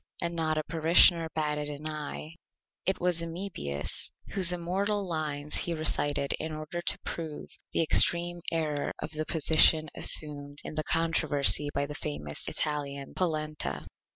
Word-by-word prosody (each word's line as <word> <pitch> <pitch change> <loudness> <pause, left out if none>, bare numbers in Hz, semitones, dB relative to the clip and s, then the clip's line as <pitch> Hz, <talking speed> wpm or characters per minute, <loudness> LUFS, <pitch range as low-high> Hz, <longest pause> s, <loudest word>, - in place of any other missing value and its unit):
And 170 0 -3
not 160 -1 -1
a 155 - -1
Parishioner 165 +1 +5
batted 150 -1 -1
an 150 +1 -5
Eye. 155 +1 -6 0.5
It 190 - +1
was 175 -1 +1
Amebius 165 - -4 0.2
whose 185 -3 +5
Immortal 195 +4 -1
Lines 150 -3 -3
he 170 - 0
recited 145 -3 0
in 160 0 -4
order 155 +3 -5
to - - 0
prove 160 -3 -6 0.2
the - - +1
Extreme 175 +2 +4
Error 155 -3 -2
of 150 - -5
the 155 0 -4
Position 155 0 +5
assumed 145 -2 +2
in - - -7
the 155 0 -2
Controversy 155 -3 +2
by 140 - 0
the 150 - -7
Famous 75 - -4
Italian, 140 -2 -2
Polenta. 155 -4 -3
155 Hz, 145 wpm, -29 LUFS, 150-170 Hz, 0.5 s, Parishioner